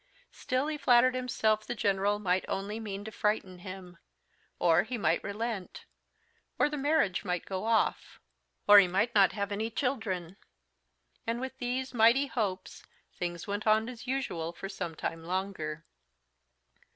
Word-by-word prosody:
Still 255 +2 -1
he 305 -1 -3
flattered 250 -1 +5
himself 225 -4 0
the - - -3
General 200 -1 +1
might 185 -2 0
only 205 +3 -3
mean 205 -2 -6
to 220 - -6
frighten 210 -4 -1
him; 185 -1 -9 0.6
or 165 -2 +4
he 245 +2 -4
might 210 - +1
relent; 210 -2 -4 0.7
or - - +3
the 300 - -4
marriage 285 - +1
might 180 -3 -2
go 190 +1 -4
off; 225 0 0 0.5
or 205 0 +10
he 195 - +5
might 200 +6 0
not 195 -2 +5
have 200 -1 -3
any 215 +3 -1
children; 210 -8 -2 0.9
and, 230 +1 -1
with 260 +1 -5
these 255 +2 -2
mighty 235 +4 +5
hopes, 200 -8 -3 0.3
things 175 -1 -4
went 205 +2 -3
on 215 +1 +4
as 250 0 -9
usual 210 -12 -2
for 195 - -7
some 170 -4 -5
time 165 +1 -4
longer. 165 -4 -3
205 Hz, 150 wpm, -30 LUFS, 185-240 Hz, 0.9 s, or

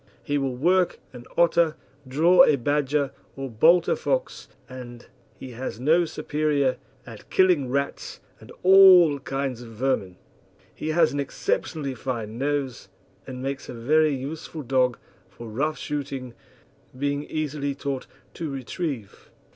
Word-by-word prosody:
He 145 0 -1
will 135 -2 -2
work 180 +7 +2
an 120 -1 -11
otter, 170 -2 +3 0.3
draw 165 +7 +5
a 150 - +5
badger, 145 +1 0 0.2
or 135 -2 -6
bolt 165 +11 +4
a - - +2
fox, - - -2 0.2
and 120 -2 -10 0.3
he 130 - -9
has 120 -1 -6
no 160 +7 +3
superior 150 -3 0 0.3
at - - -12
killing 180 -9 +3
rats 140 +2 -3 0.2
and - - -14
all 185 -5 +7
kinds 135 -2 -3
of 120 - -10
vermin. 110 -6 -1 0.6
He - - -6
has 160 -1 +3
an 145 - -2
exceptionally 150 - -2
fine 115 -3 -5
nose, 140 -3 -2 0.4
and 130 -1 -7
makes 135 0 -4
a - - -6
very 150 +5 +2
useful 150 +3 -6
dog 125 -1 +1 0.3
for 120 - -11
rough 145 +8 -2
shooting, 135 -4 -5 0.6
being 145 +1 -1
easily 145 -2 -3
taught 140 -2 -4 0.3
to 160 - -5
retrieve. 135 - -5
140 Hz, 140 wpm, -25 LUFS, 130-155 Hz, 0.6 s, all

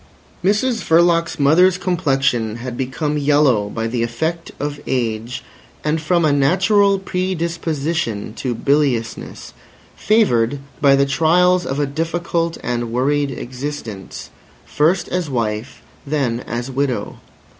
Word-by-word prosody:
Mrs 220 +5 +1
Verloc's 170 0 +3
mother's 175 +6 +5
complexion 135 - 0
had 120 +1 -6
become 145 +4 -2
yellow 140 -8 +3
by 115 +1 -3
the 115 +1 -2
effect 160 +9 -2
of 145 0 -3
age 120 -1 -2 0.4
and 155 +1 0
from 170 +1 +2
a 150 - +3
natural 190 +8 +3
predisposition 165 - -2
to 125 -3 -2
biliousness, 135 -3 -1 0.4
favoured 145 - +2 0.2
by 140 -2 +6
the 140 0 +3
trials 175 +5 +3
of 135 +2 -2
a 145 - +2
difficult 165 +3 -2
and 120 -1 -2
worried 140 +4 +1
existence, 125 -5 -7 0.3
first 165 +5 +1
as 180 -4 -2
wife, 115 -2 -3 0.2
then 135 -5 -1
as 120 +3 -4
widow. 135 -1 -2
145 Hz, 120 wpm, -19 LUFS, 125-170 Hz, 0.4 s, by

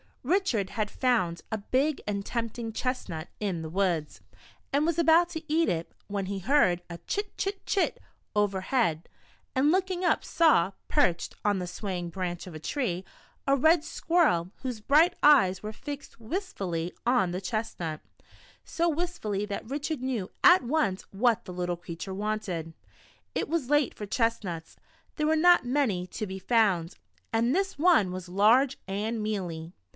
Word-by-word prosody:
RICHARD 265 - +1
had 215 -1 -2
found 185 -10 +1
a 220 - 0
big 265 +8 0
and 200 -1 -2
tempting 230 -1 -3
chestnut 215 -11 -3
in 190 -6 -2
the 160 - -5
woods, 175 -4 -1 0.5
and 285 +2 +3
was 335 0 0
about 335 +1 +5
to 320 -2 -6
eat 330 +1 +3
it, 165 0 -2 0.2
when 200 -1 -2
he 195 0 -3
heard 190 -5 +3
a 170 - -5
*' - - -46
chit, 410 0 -2
chit, 390 0 -3
chit," 390 - 0 0.4
over 205 -2 +1
head, 185 -8 0 0.5
and 275 +3 +4
looking 370 0 0
up 350 - +2
saw, 305 - +4 0.2
perched 175 -1 +1
on 205 -1 +3
the 180 -1 -3
swaying 180 -2 -4
branch 175 0 -4
of 180 - -9
a 155 - -7
tree, 185 - -2 0.4
a 275 - +5
red 315 +4 +4
squirrel, 315 - +1
whose 250 -4 -4
bright 300 +10 +4
eyes 215 -11 +6
were 215 +1 -5
fixed 285 +1 -8
wistfully 195 - -3
on 240 -7 +3
the 180 +2 -3
chestnut; 185 -7 -3 0.6
so 340 +1 0
wistfully 295 - -2
that 205 +2 -5
Richard 290 0 -3
knew 245 -7 -2
at 360 -3 +7
once 245 -8 0
what 230 +3 +2
the 180 - -7
little 175 -1 -2
creature 175 +2 -7
wanted. 195 -5 -3 0.6
It - - -1
was 315 -6 -1
late 295 -3 +3
for 210 - -6
chestnuts, 210 -7 -2 0.4
there 300 - 0
were 315 - +3
not 345 -2 +5
many 245 -9 +1
to 215 - -4
be 190 -1 -6
found, 190 -5 +2 0.4
and 235 +5 +2
this 390 -2 -1
one 305 - +4
was 185 -1 -6
large 230 +9 +4
and 215 +4 -2
mealy. 180 -6 -4
220 Hz, 165 wpm, -28 LUFS, 185-290 Hz, 0.6 s, at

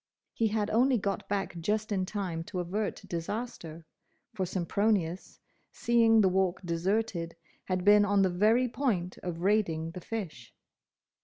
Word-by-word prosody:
He 225 - +1
had 210 -1 -1
only 250 +3 +3
got 200 -2 -3
back 195 -2 -2
just 215 +5 -1
in 190 -2 0
time 185 -6 -3
to 195 -1 -5
avert 200 +5 -3
disaster, 170 -3 -5 0.5
for 190 -4 -2
Sempronius, 185 0 -1 0.3
seeing 230 -2 +4
the 195 - +4
Walk 185 -1 +1
deserted, 170 0 -1 0.3
had 185 0 -2
been 205 0 +7
on 200 -1 +3
the 190 - +3
very 220 +7 +3
point 225 -8 -2
of 170 -2 -5
raiding 170 -6 +1
the 180 - -8
fish. 175 - -6
195 Hz, 145 wpm, -29 LUFS, 175-215 Hz, 0.5 s, been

